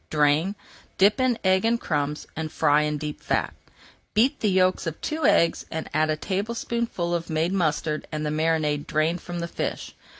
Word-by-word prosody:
Drain, 150 Hz, +6 st, +2 dB, 0.4 s
dip 205 Hz, +6 st, +4 dB
in 255 Hz, -3 st, +2 dB
egg 190 Hz, 0 st, +3 dB
and 230 Hz, +1 st, +2 dB
crumbs, 150 Hz, -4 st, -2 dB
and 155 Hz, 0 st, -4 dB
fry 150 Hz, -1 st, +3 dB
in 150 Hz, 0 st, -1 dB
deep 150 Hz, 0 st, -5 dB
fat. -, -, -1 dB, 0.6 s
Beat 240 Hz, +6 st, +3 dB
the 215 Hz, -, +1 dB
yolks 185 Hz, -1 st, +2 dB
of 160 Hz, -, -4 dB
two 310 Hz, -2 st, 0 dB
eggs, 170 Hz, -, +3 dB
add 155 Hz, -1 st, -1 dB
a 155 Hz, -, +2 dB
teaspoonful 205 Hz, -1 st, -2 dB
of 170 Hz, -1 st, -2 dB
made 160 Hz, +3 st, 0 dB
mustard 155 Hz, -4 st, 0 dB
and 155 Hz, -1 st, -3 dB
the 150 Hz, -, -1 dB
marinade 155 Hz, -2 st, 0 dB
drained 160 Hz, +3 st, 0 dB
from 175 Hz, -1 st, -5 dB
the 170 Hz, -, -3 dB
fish. -, -, -4 dB
165 Hz, 175 wpm, -25 LUFS, 155-190 Hz, 0.6 s, dip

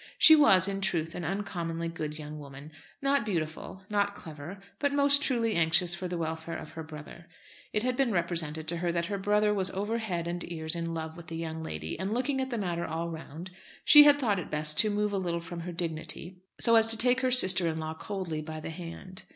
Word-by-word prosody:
She 315 Hz, -, +9 dB
was, 195 Hz, -, +6 dB
in 195 Hz, 0 st, -3 dB
truth, 170 Hz, -4 st, -1 dB
an 175 Hz, -, -6 dB
uncommonly 170 Hz, -3 st, -3 dB
good 155 Hz, -2 st, -5 dB
young 150 Hz, 0 st, -8 dB
woman; 140 Hz, +1 st, -11 dB, 0.3 s
not 275 Hz, -2 st, +2 dB
beautiful, 175 Hz, -1 st, -4 dB
not 205 Hz, -1 st, 0 dB
clever, 160 Hz, +2 st, -9 dB, 0.2 s
but 285 Hz, 0 st, +1 dB
most 280 Hz, 0 st, +5 dB
truly 235 Hz, -5 st, +1 dB
anxious 170 Hz, +1 st, +3 dB
for 180 Hz, +1 st, -4 dB
the 175 Hz, 0 st, -4 dB
welfare 160 Hz, 0 st, -4 dB
of 155 Hz, -, -9 dB
her 160 Hz, +1 st, -7 dB
brother. 155 Hz, +2 st, -11 dB, 0.4 s
It 210 Hz, -, 0 dB
had 255 Hz, 0 st, 0 dB
been 265 Hz, -2 st, +1 dB
represented 165 Hz, -4 st, -1 dB
to 170 Hz, -, -1 dB
her 170 Hz, 0 st, -1 dB
that 170 Hz, 0 st, -1 dB
her 200 Hz, +2 st, -3 dB
brother 210 Hz, +1 st, +2 dB
was 190 Hz, -2 st, +2 dB
over 205 Hz, +5 st, -2 dB
head 180 Hz, -7 st, -3 dB
and 175 Hz, +1 st, -3 dB
ears 160 Hz, 0 st, -3 dB
in 165 Hz, -1 st, -3 dB
love 160 Hz, 0 st, -5 dB
with 170 Hz, -1 st, -12 dB
the 165 Hz, -, -6 dB
young 160 Hz, -1 st, -5 dB
lady, 80 Hz, -, -5 dB
and 195 Hz, +4 st, -2 dB
looking 265 Hz, +2 st, -1 dB
at 260 Hz, -, -3 dB
the 240 Hz, -, -3 dB
matter 175 Hz, -4 st, -2 dB
all 165 Hz, +1 st, -3 dB
round, 165 Hz, +2 st, -8 dB, 0.3 s
she 295 Hz, -1 st, +10 dB
had 290 Hz, -1 st, +7 dB
thought 215 Hz, -9 st, 0 dB
it 175 Hz, -, -7 dB
best 150 Hz, 0 st, +1 dB
to 215 Hz, -, +7 dB
move 210 Hz, 0 st, -1 dB
a 195 Hz, -, 0 dB
little 170 Hz, -2 st, -2 dB
from 170 Hz, +1 st, -8 dB
her 175 Hz, +1 st, -6 dB
dignity 170 Hz, +2 st, -5 dB, 0.2 s
so 230 Hz, -1 st, +4 dB
as 225 Hz, 0 st, +6 dB
to 225 Hz, 0 st, +3 dB
take 250 Hz, +3 st, +3 dB
her 255 Hz, -, +1 dB
sister 190 Hz, -8 st, +5 dB
in 160 Hz, -1 st, -2 dB
law 160 Hz, 0 st, -4 dB
coldly 170 Hz, -2 st, -5 dB
by 155 Hz, 0 st, -7 dB
the 155 Hz, -, -6 dB
hand. 180 Hz, +2 st, -7 dB
175 Hz, 230 wpm, -29 LUFS, 160-210 Hz, 0.4 s, she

